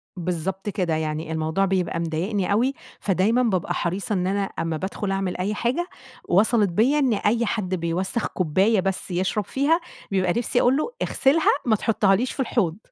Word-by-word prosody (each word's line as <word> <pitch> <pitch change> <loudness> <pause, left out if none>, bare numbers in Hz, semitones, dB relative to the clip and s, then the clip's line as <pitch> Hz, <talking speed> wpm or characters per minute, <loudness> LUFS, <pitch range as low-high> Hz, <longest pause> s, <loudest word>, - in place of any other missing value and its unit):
بالضبط 180 +3 -3
كده، 180 -6 -1
يعني 155 0 -3
الموضوع 160 +4 0
بيبقى 185 -3 0
مضايقني 180 +5 -1
أوي، 245 +7 +2 0.3
فدايمًا 210 +6 +2
بابقى 190 -7 0
حريصة 190 +5 -2
إن 180 -1 0
أنا 200 +1 0
أمّا 165 -4 -3
بادخُل 195 +3 -3
أعمل 195 -2 -2
أي 195 +4 -1
حاجة، 260 +12 -1 0.4
وصَلِت 210 +2 +3
بيّا 240 +12 +2
إن 260 -5 +2
أي 230 +3 +1
حد 195 -3 -1
بيوسَّخ 180 +6 -2
كوباية 190 +5 +2
بس 195 +1 -2
يشرب 185 +3 -1
فيها، 295 +5 +2 0.3
بيبقى 185 -2 +1
نِفسي 245 +1 +1
أقول 255 +3 +3
له: 310 - -1
"اغسلها. 290 +5 +3
ما 220 -3 +4
تحطهاليش 210 +2 +2
في - - -10
الحوض.". 205 -9 0
195 Hz, 165 wpm, -24 LUFS, 180-230 Hz, 0.4 s, ما